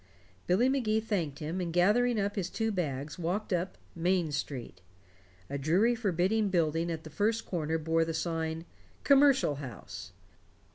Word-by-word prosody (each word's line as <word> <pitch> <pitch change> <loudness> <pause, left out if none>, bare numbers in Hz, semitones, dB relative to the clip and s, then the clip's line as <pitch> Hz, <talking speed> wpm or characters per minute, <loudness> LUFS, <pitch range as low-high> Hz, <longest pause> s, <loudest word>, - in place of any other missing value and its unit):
Billy 195 +8 +4
Magee 240 -5 +2
thanked 180 -10 -2
him, 160 +5 -3
and 170 -2 -2
gathering 215 +7 +3
up 200 0 -1
his 185 -4 -2
two 225 +2 -1
bags, 150 -5 -3
walked 185 +5 -1
up 180 +2 -1 0.2
"Main 175 -1 +1
Street." 130 - -5 0.7
A 140 - -4
dreary 180 - +3
forbidding 205 -1 +1
building 165 -2 +1
at 160 -1 -4
the 155 - -10
first 220 +6 0
corner 160 -2 -1
bore 165 +1 +1
the 165 0 -3
sign 160 0 -2 0.4
"Commercial 275 - +5
House". 135 -4 -8
175 Hz, 150 wpm, -30 LUFS, 160-215 Hz, 0.7 s, Commercial